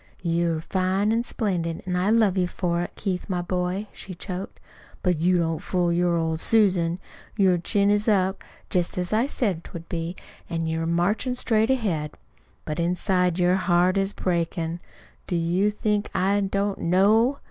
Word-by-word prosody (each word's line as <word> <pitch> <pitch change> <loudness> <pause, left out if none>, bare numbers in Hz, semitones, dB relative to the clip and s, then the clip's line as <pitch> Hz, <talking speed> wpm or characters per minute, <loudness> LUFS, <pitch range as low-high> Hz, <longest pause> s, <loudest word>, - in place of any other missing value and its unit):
"You're 170 -1 0
fine 190 +4 0
an' 230 +1 +2
splendid, 180 -9 -2
an' 180 -1 -2
I 180 +3 +1
love 215 -4 +4
you 180 -2 +1
for 175 -1 -1
it, 175 - -6
Keith, 190 -1 -3
my 180 -2 -1
boy," 180 +3 -2
she 185 - -8
choked; 185 +2 -6 0.4
"but 180 -4 +1
you 180 +2 +3
don't 165 -2 0
fool 180 -3 0
your 175 0 +2
old 160 -1 -1
Susan. 180 -5 +2 0.4
Your 185 -4 +4
chin 200 +4 +2
is 210 +1 +1
up, 190 -2 +2 0.3
jest 180 -1 0
as 180 +2 -2
I 230 +5 +2
said 195 - -1
'twould 170 -1 -9
be, 170 +1 -3 0.3
an' 165 -1 -2
you're 160 0 -1
marchin' 200 +9 +1
straight 220 -2 +2
ahead. 190 - -1 0.5
But 155 +1 -4
inside, 180 0 +1
your 180 +1 +3
heart 180 0 +2
is 195 0 +1
breakin'. 170 -2 -2 0.5
Do 180 - -1
you 175 +4 +2
think 210 0 -1
I 195 +2 +2
don't 200 0 -1
KNOW? 215 +9 +3
180 Hz, 170 wpm, -25 LUFS, 170-200 Hz, 0.5 s, love